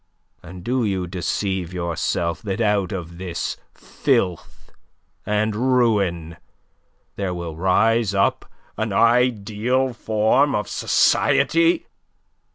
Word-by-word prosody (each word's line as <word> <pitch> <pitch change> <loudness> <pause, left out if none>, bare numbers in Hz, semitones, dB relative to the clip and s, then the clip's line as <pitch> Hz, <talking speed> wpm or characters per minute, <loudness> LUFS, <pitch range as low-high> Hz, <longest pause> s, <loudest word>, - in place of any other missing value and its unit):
And 90 +1 -11
do 125 +3 0
you 95 -4 -1
deceive 90 0 -3
yourself 85 -1 -2
that 100 -1 -4
out 105 -4 +1
of 85 -2 -6
this 90 -2 -4 0.2
filth 90 -3 -2 0.6
and 105 0 0
ruin 105 -10 +1 0.8
there 95 -3 -2
will 85 -2 -6
rise 100 +4 +2
up 100 0 0 0.3
an - - -2
ideal 120 +1 +2
form 110 +5 +1
of - - -2
society? 335 0 +2
100 Hz, 100 wpm, -22 LUFS, 90-115 Hz, 0.8 s, rise